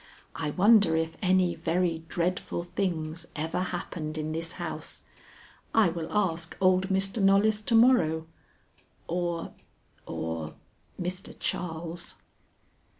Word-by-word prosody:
I 160 -2 -2
wonder 200 +1 +5
if 160 0 -1
any 185 -2 +3
very 165 -1 0
dreadful 175 0 -1
things 170 -2 -2
ever 160 +3 -2
happened 170 -3 -4
in 155 0 -2
this 165 +1 -2
house? - - -5 0.7
I 220 -5 +6
will 165 -1 -4
ask 170 -5 0
old 185 0 +4
Mr. 195 +3 +1
Knollys 200 +2 +4
to 230 +2 +1
morrow, 175 -10 +5 0.8
or 175 -1 -2 0.5
or 80 -1 -4 0.4
Mr. 185 +1 -4
Charles. 170 0 -3
175 Hz, 110 wpm, -28 LUFS, 160-190 Hz, 0.8 s, I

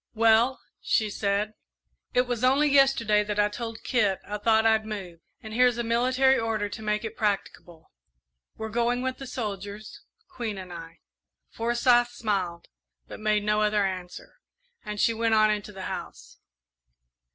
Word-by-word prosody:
"Well," 230 +3 +4 0.2
she 215 -2 +1
said, 205 +1 -1 0.6
"it 250 - +3
was 245 -1 -4
only 275 +4 +4
yesterday 270 -7 +4
that 210 0 -3
I 205 0 +3
told 225 +1 -6
Kit 210 -7 +1
I 210 0 -4
thought 220 +1 +3
I'd 220 -1 +4
move, 195 -6 -7 0.2
and 220 -1 -8
here's 250 0 +3
a 235 - -1
military 255 +3 +3
order 220 -2 -1
to 215 +2 -8
make 210 +1 -1
it 225 0 -6
practicable. 180 -5 -3 0.7
We're 220 0 -5
going 240 +2 0
with 260 0 -3
the 270 - -7
soldiers 210 -3 -6 0.3
Queen 235 - -5
and 185 -2 -8
I." 165 0 -10 0.5
Forsyth 240 +1 +2
smiled, 195 -7 -2 0.4
but - - -9
made 215 -1 +1
no 210 0 +1
other 210 -1 +2
answer, 185 -2 -7 0.4
and 210 -2 -6
she 230 - +3
went 225 0 +1
on 215 0 +5
into 210 0 -3
the 190 -2 -8
house. - - -8
220 Hz, 160 wpm, -26 LUFS, 205-240 Hz, 0.7 s, on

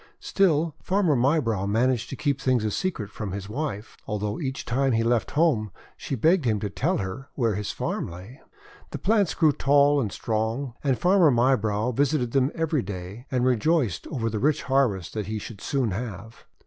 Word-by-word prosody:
Still 165 -5 +1
Farmer 185 -6 +2
Mybrow 120 -7 +1
managed 120 +3 +1
to - - -5
keep 140 +4 -1
things 130 -4 +1
a 105 - 0
secret 120 - -3
from 100 -4 -5
his 100 -1 -5
wife, 115 -3 -5
although 105 0 -2
each 135 -3 -4
time 130 +2 +1
he 115 0 +2
left 115 0 +1
home 140 -10 +2 0.3
she 135 - -4
begged 160 - +3
him 110 -4 +1
to 105 - -3
tell 160 - 0
her 110 +7 -5
where 115 -5 +1
his 105 +1 -3
farm - - -3
lay. 95 - -11 0.5
The - - -5
plants 210 -4 +1
grew 155 -3 +4
tall 145 +1 +3
and 105 -5 -2
strong, 115 +5 -2
and 135 -4 +1
Farmer 180 -2 +4
Mybrow 120 -3 +2
visited 135 -1 +1
them 135 +1 +2
every 160 -3 0
day, 100 +5 -7
and 125 -1 0
rejoiced 130 - +1
over 125 -8 -2
the 110 -1 -2
rich 150 +5 +1
harvest 125 -10 +1
that 105 -3 -3
he 110 +1 -3
should 105 0 -8
soon 130 -6 0
have. 110 +1 -7
125 Hz, 185 wpm, -25 LUFS, 105-145 Hz, 0.5 s, grew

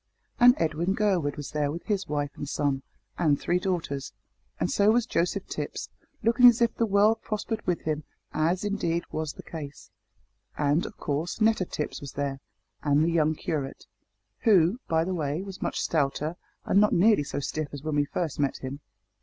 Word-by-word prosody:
And 245 +1 +8
Edwin 165 +4 0
Gurwood 185 -9 +1
was 145 - -6
there 150 -2 0
with 170 +3 -6
his 205 -3 -1
wife 145 -1 -1
and 145 - -6
son 140 -3 0 0.4
and 150 -5 +3
three 175 +1 +1
daughters; 165 -8 -3 0.5
and - - 0
so 205 +1 +4
was 235 +1 +3
Joseph 170 +1 0
Tipps, - - -5 0.3
looking 235 +3 +7
as 240 0 +6
if 235 -1 +3
the 230 - 0
world 205 +2 +4
prospered 220 +1 -3
with 180 -2 +1
him, 155 -1 -2 0.3
as, 165 +5 +1
indeed, 175 -5 -1
was 155 -2 -3
the - - -11
case. 145 -4 -8 0.7
And, 150 +3 +2
of - - -12
course, 150 +7 -2
Netta 220 -4 +3
Tipps 150 - -4
was 140 -2 -8
there, 140 -1 -2 0.4
and 145 +1 +3
the 170 - +1
young 155 -1 +2
curate, 145 -4 -4 0.5
who, 200 -1 +4
by 160 0 +2
the 185 +2 -2
way, 155 0 -2
was 195 -2 -9
much - - -2
stouter 150 +1 0 0.3
and 200 - +4
not 210 - +4
nearly 200 -2 +5
so 145 - -4
stiff 150 +2 -3
as 145 -1 -8
when 155 -1 -2
we 145 0 +3
first 160 0 -3
met 140 -2 +1
him. 135 +2 -6
165 Hz, 185 wpm, -27 LUFS, 145-200 Hz, 0.7 s, And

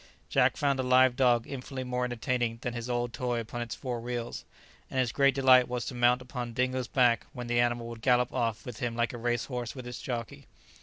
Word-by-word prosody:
Jack - - +3
found 140 -2 +1
a - - +3
live 130 0 +4
dog 120 -3 +3
infinitely 135 -1 -6
more 125 0 -2
entertaining 120 -1 -1
than 125 - -2
his 120 0 -5
old 120 -1 -1
toy 120 -1 -1
upon 115 +1 -5
its 120 - -4
four 125 -3 -4
wheels, 120 0 -4 0.4
and 130 - -2
his 125 -3 +1
great 140 0 +3
delight 130 -2 +6
was 125 -1 -3
to - - -5
mount 125 +1 +3
upon 125 -2 -5
Dingo's 130 0 0
back, 120 -3 +2
when 125 -2 -6
the 120 0 +1
animal 120 -1 +1
would 115 -1 -9
gallop 125 0 +2
off 115 -4 -1
with 120 -4 -7
him 120 -2 -2
like 120 +1 0
a 120 - -6
race 120 0 0
horse 125 -1 -5
with 130 -2 -8
his 125 0 -6
jockey. 120 -3 -5
125 Hz, 225 wpm, -29 LUFS, 120-125 Hz, 0.4 s, delight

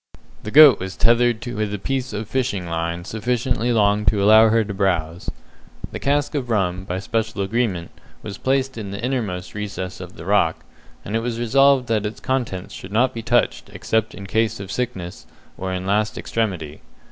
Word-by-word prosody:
The - - -6
goat 145 -1 +8
was 95 +1 -5
tethered 120 0 +3
with 110 -4 -3
a 105 - -2
piece 130 +5 -3
of 105 0 -4
fishing 110 -7 -1
line 85 +1 -3
sufficiently 120 +2 -1
long 105 -2 +3
to 100 0 +2
allow 110 +2 +7
her 115 0 +3
to 100 -1 -5
browse. 90 -4 -1 0.6
The - - -5
cask 145 +2 0
of 135 -5 -3
rum, 95 -4 0
by 90 -1 -3
special 110 0 -2
agreement, 95 -5 -1 0.3
was 105 -1 -7
placed 135 -2 0
in 100 -2 -6
the 100 +1 -6
innermost 110 -8 -3
recess 100 -3 -5
of 90 -1 -9
the 85 - -10
rock, 95 -5 +1 0.4
and 105 - -3
it - - +2
was 115 -1 -3
resolved 135 +2 +4
that 110 -2 +1
its 105 - -8
contents 120 -9 -3
should 95 - -9
not 125 +4 +2
be 115 - -5
touched 120 +2 +1
except 110 -1 -1
in 100 - -8
case 110 +2 0
of 100 -1 -7
sickness, 95 -9 -4 0.3
or 95 0 -4
in 90 0 -3
last 105 +2 0
extremity. 90 -10 -3
105 Hz, 185 wpm, -21 LUFS, 95-120 Hz, 0.6 s, goat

